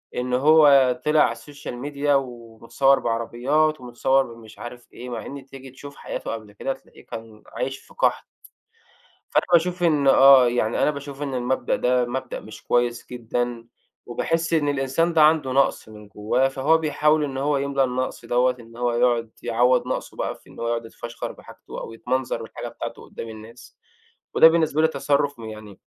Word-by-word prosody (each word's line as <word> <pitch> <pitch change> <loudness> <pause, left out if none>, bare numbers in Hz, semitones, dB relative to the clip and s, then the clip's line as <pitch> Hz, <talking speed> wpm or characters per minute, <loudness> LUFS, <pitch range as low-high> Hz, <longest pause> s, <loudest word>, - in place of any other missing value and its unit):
إن 125 0 -2
هو 140 -1 +6
طلِع 150 0 +4
على - - 0
الsocial 145 -3 -9 0.2
media 145 +1 -2
ومتصوّر 125 0 +1
بعربيات 130 +6 0
ومتصوّر 130 +2 +1
بمش 110 -1 -15
عارف 120 0 -9
إيه، 125 +1 -9
مع 120 - -5
إن 140 -1 -8
تيجي 135 -1 -12
تشوف 140 +2 -12
حياته - - -6
قبل 110 -2 -7
كده 135 +6 -3
تلاقيه 135 - -19
كان 110 -1 -10
عايش 135 0 -4
في - - -20
قحْط. - - +1 1.1
فأنا - - +2
باشوف 175 +1 +3
إن 150 -5 +2
آه، 135 -2 +7
يعني 120 -2 0
أنا - - +4
باشوف 140 -1 -8
إن 140 -2 -3
المبدأ 125 +1 0
ده 125 0 +2
مبدأ 130 +1 -4
مش 110 0 -12
كويس 120 -1 0
جدًا. 120 0 -3 0.4
وباحس 165 +7 -1
إن 150 -3 +2
الإنسان 140 +5 0
ده 160 - +4
عنده 150 -4 +4
نقْص 135 -4 +1
من 105 -1 -13
جوّاه، 110 +6 0
فهو 140 +4 +2
بيحاول 150 0 +2
إن 135 -2 -4
هو 145 +1 +1
يملى 140 0 0
النقْص 130 -1 -3
دوّة، 125 +1 +2
إن 115 0 -15
هو 120 0 0
يقعُد 120 -1 +1
يعوّض 125 +2 +2
نقْصه - - -4
بقى - - -2
في - - -20
إن - - -12
هو 115 - -2
يقعُد 115 0 -1
يتفشخَر 115 +1 -7
بحاجته - - -11
أو - - -7
يتمنظَر 125 0 -2
بالحاجة 110 - -7
بتاعته - - -7
قُدّام 115 - -8
الناس. 115 - -12 0.6
وده 160 - +8
بالنسبة 160 -2 +1
لي 160 - +5
تصرُّف 145 -1 0
م 115 - -9
يعني، 110 -2 -10
130 Hz, 180 wpm, -23 LUFS, 120-145 Hz, 1.1 s, وده